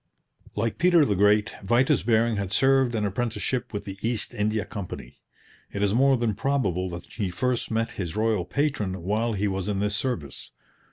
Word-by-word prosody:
Like 115 Hz, +2 st, -1 dB
Peter 175 Hz, -3 st, +5 dB
the 105 Hz, -, +1 dB
Great, 105 Hz, +2 st, +3 dB
Vitus 120 Hz, +3 st, +3 dB
Bering 115 Hz, +1 st, +2 dB
had 100 Hz, -2 st, -3 dB
served 135 Hz, +1 st, +3 dB
an 105 Hz, -2 st, 0 dB
apprenticeship 115 Hz, +3 st, -2 dB
with 100 Hz, -1 st, -5 dB
the 95 Hz, -1 st, -7 dB
East 115 Hz, -1 st, -1 dB
India 105 Hz, 0 st, 0 dB
Company. 90 Hz, -, -8 dB, 0.5 s
It 100 Hz, -, -2 dB
is 100 Hz, -1 st, +2 dB
more 135 Hz, +2 st, +4 dB
than 115 Hz, -2 st, 0 dB
probable 100 Hz, -7 st, 0 dB
that 85 Hz, 0 st, -6 dB
he 100 Hz, -5 st, -4 dB
first 125 Hz, +6 st, -1 dB
met 115 Hz, 0 st, -1 dB
his 90 Hz, -2 st, -5 dB
royal 110 Hz, -3 st, +1 dB
patron 105 Hz, -, -1 dB
while 110 Hz, +5 st, 0 dB
he 105 Hz, 0 st, 0 dB
was 95 Hz, -1 st, -2 dB
in 105 Hz, -2 st, -1 dB
this 105 Hz, +1 st, 0 dB
service. 105 Hz, -, -4 dB
105 Hz, 180 wpm, -26 LUFS, 100-120 Hz, 0.5 s, Peter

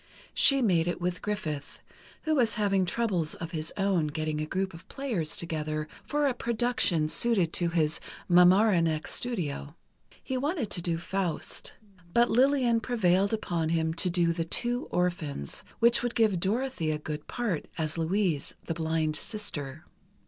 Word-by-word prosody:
She 275 Hz, -2 st, +5 dB
made 175 Hz, -6 st, +3 dB
it 175 Hz, -, -2 dB
with 180 Hz, 0 st, -2 dB
Griffith, 160 Hz, -9 st, -4 dB, 0.4 s
who 315 Hz, -, +1 dB
was 240 Hz, -6 st, +2 dB
having 195 Hz, -3 st, +2 dB
troubles 185 Hz, -6 st, 0 dB
of 165 Hz, 0 st, -6 dB
his 155 Hz, -1 st, -3 dB
own 195 Hz, -5 st, +1 dB
getting 155 Hz, 0 st, -2 dB
a 155 Hz, -, -3 dB
group 190 Hz, +2 st, -2 dB
of 165 Hz, +2 st, -12 dB
players 225 Hz, -, -2 dB
together 155 Hz, -2 st, -3 dB, 0.2 s
for 295 Hz, 0 st, 0 dB
a 270 Hz, -, +2 dB
production 235 Hz, -9 st, 0 dB
suited 190 Hz, -2 st, +2 dB
to 175 Hz, -1 st, +1 dB
his 160 Hz, -2 st, +1 dB, 0.3 s
Mamaroneck 180 Hz, -3 st, +4 dB
studio. 160 Hz, -, -2 dB, 0.5 s
He 260 Hz, -, -2 dB
wanted 280 Hz, -, -2 dB
to 175 Hz, -, +1 dB
do 170 Hz, -1 st, -1 dB
"Faust," 180 Hz, 0 st, -2 dB, 0.4 s
but 235 Hz, 0 st, +4 dB
Lillian 250 Hz, -2 st, +3 dB
prevailed 200 Hz, -5 st, +2 dB
upon 175 Hz, -7 st, -1 dB
him 160 Hz, -1 st, +1 dB
to 180 Hz, +3 st, +1 dB
do 170 Hz, -1 st, +2 dB
"The 165 Hz, 0 st, -1 dB
Two 240 Hz, +8 st, -1 dB
Orphans," 165 Hz, -, -2 dB
which 235 Hz, +1 st, +5 dB
would 245 Hz, -1 st, -2 dB
give 215 Hz, -6 st, +3 dB
Dorothy 210 Hz, -2 st, -1 dB
a 155 Hz, -, 0 dB
good 150 Hz, 0 st, -6 dB
part, 220 Hz, -10 st, -2 dB
as 155 Hz, -2 st, -1 dB
Louise, 165 Hz, -2 st, 0 dB
the 165 Hz, -, -2 dB
blind 160 Hz, -1 st, -1 dB
sister. 155 Hz, -, -5 dB
180 Hz, 155 wpm, -28 LUFS, 160-225 Hz, 0.5 s, She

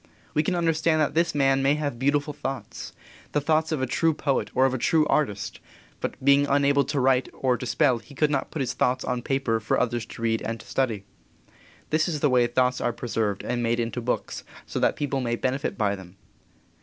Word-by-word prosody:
We 150 Hz, -, +3 dB
can 160 Hz, -, -1 dB
understand 165 Hz, -1 st, +2 dB
that 150 Hz, -2 st, +1 dB
this 165 Hz, 0 st, +1 dB
man 135 Hz, -1 st, +3 dB
may 140 Hz, +2 st, +3 dB
have 145 Hz, -5 st, -3 dB
beautiful 145 Hz, +2 st, +1 dB
thoughts 135 Hz, -1 st, -6 dB, 0.4 s
the 150 Hz, -, +3 dB
thoughts 160 Hz, +2 st, +1 dB
of 150 Hz, -4 st, -1 dB
a -, -, +3 dB
true 160 Hz, +5 st, +1 dB
poet 140 Hz, -3 st, 0 dB
or 130 Hz, -, +5 dB
of 135 Hz, -, +1 dB
a 130 Hz, -, -2 dB
true 155 Hz, +5 st, +3 dB
artist 120 Hz, -11 st, -1 dB, 0.4 s
but -, -, -3 dB
being 140 Hz, 0 st, +5 dB
unable 140 Hz, 0 st, +3 dB
to 140 Hz, +1 st, -1 dB
write 130 Hz, 0 st, +2 dB
or 130 Hz, -2 st, +1 dB
to 125 Hz, +2 st, -5 dB
spell 120 Hz, 0 st, +2 dB
he 140 Hz, -, -16 dB
could 150 Hz, +1 st, +2 dB
not 140 Hz, -2 st, -1 dB
put 155 Hz, -, -4 dB
his 125 Hz, -1 st, -1 dB
thoughts 125 Hz, 0 st, 0 dB
on 125 Hz, -1 st, -1 dB
paper 135 Hz, -4 st, 0 dB
for 110 Hz, -, 0 dB
others 120 Hz, -2 st, -1 dB
to 115 Hz, -, -9 dB
read 115 Hz, -1 st, +1 dB
and 115 Hz, 0 st, -4 dB
to -, -, -13 dB
study. 115 Hz, -7 st, -1 dB, 0.9 s
This 155 Hz, +2 st, +2 dB
is 160 Hz, -4 st, -2 dB
the 145 Hz, -2 st, +2 dB
way 125 Hz, -1 st, +4 dB
thoughts 125 Hz, +1 st, +1 dB
are 120 Hz, -, +1 dB
preserved 110 Hz, -4 st, -2 dB
and 120 Hz, -1 st, -2 dB
made 120 Hz, 0 st, 0 dB
into 115 Hz, +1 st, -2 dB
books 125 Hz, +1 st, -3 dB, 0.2 s
so -, -, -4 dB
that -, -, +2 dB
people 140 Hz, -2 st, -2 dB
may 120 Hz, -1 st, -1 dB
benefit 130 Hz, +4 st, -2 dB
by 100 Hz, -2 st, +1 dB
them. 95 Hz, -1 st, -13 dB
135 Hz, 220 wpm, -25 LUFS, 120-145 Hz, 0.9 s, or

